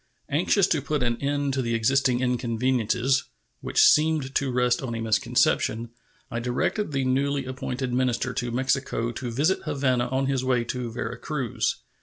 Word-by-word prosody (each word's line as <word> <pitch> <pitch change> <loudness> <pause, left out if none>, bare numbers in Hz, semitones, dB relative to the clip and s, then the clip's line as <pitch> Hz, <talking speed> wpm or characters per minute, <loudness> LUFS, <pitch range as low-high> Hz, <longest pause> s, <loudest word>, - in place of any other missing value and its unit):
Anxious 180 +6 +3
to 160 -5 0
put 150 -1 -1
an 120 -1 0
end 140 0 0
to 135 - 0
the 115 -2 -1
existing 125 +2 +2
inconveniences 125 +1 +1 0.3
(which - - +2
seemed 150 -3 +4
to 140 -2 0
rest 125 -1 +1
on 120 -4 -4
a - - -3
misconception), 115 +1 +1 0.4
I 115 - -2
directed 125 - -1
the 135 -2 0
newly 135 +1 0
appointed 130 0 -4
minister 125 0 0
to 125 -2 -2
Mexico 130 -1 -1
to 120 +1 -5
visit 150 +11 +1
Havana 130 -5 +1
on 130 +2 0
his 135 -1 0
way 125 -2 +1
to 120 0 -4
Vera 120 +1 -5
Cruz. 135 -7 -2
130 Hz, 165 wpm, -25 LUFS, 120-135 Hz, 0.4 s, seemed